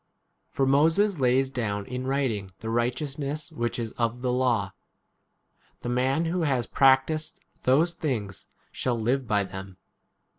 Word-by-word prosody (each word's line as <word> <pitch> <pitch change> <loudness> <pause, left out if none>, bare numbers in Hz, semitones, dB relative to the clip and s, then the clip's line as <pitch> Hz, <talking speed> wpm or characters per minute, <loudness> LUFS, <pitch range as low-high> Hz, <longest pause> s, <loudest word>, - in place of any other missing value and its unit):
5 - - -36
For 135 - +2
Moses 160 +7 +3
lays 130 +1 +3
down 105 -6 -2
in 125 +2 -4
writing 115 -9 -1
the 110 - -3
righteousness 140 +5 -2
which 120 0 -2
is 115 -2 -3
of 120 +1 0
the 125 - +1
law, 120 -6 +1 1.1
The 120 - -4
man 130 +6 +1
who 175 +2 -1
has 130 -7 +1
practised 135 +5 +3 0.3
those 155 +7 +4
things 115 - -3 0.2
shall 120 -2 -1
live 125 +3 0
by 105 -2 +2
them. 95 -1 -8
130 Hz, 145 wpm, -27 LUFS, 115-140 Hz, 1.1 s, those